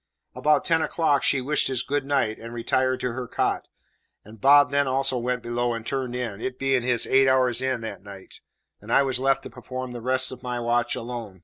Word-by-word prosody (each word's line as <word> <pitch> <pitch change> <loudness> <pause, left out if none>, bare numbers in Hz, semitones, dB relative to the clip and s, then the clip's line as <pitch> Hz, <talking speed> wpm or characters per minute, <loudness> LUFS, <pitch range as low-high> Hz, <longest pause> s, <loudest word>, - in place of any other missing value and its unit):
About 150 0 +2
ten 165 -1 +2
o'clock 160 -3 +1
she 135 - +1
wished 145 +2 +1
us 130 -2 -1
"good 145 0 -2
night," 135 -6 0
and 115 +1 -9
retired 130 +2 0
to 125 - -1
her 125 +1 -5
cot; - - -1 0.6
and 110 +1 -14
Bob 140 0 +6
then 140 0 +2
also 135 0 +1
went 125 0 -2
below 120 0 -1
and 115 -1 -7
turned 130 -2 -3
in, 115 -4 -4
it 130 +1 -4
being 135 -1 +1
his 120 -1 +1
"eight 135 0 +4
hours 130 -2 +2
in" 130 -2 -1
that 100 -4 -6
night, 100 -1 -12 0.4
and - - -9
I 140 - +5
was 130 -2 0
left 135 +1 +1
to - - -9
perform 130 -1 -7
the 120 -1 -7
rest 130 +2 +1
of 125 -1 -9
my 125 -1 -4
watch 120 0 0
alone. 115 -5 -7
125 Hz, 220 wpm, -25 LUFS, 120-135 Hz, 0.6 s, Bob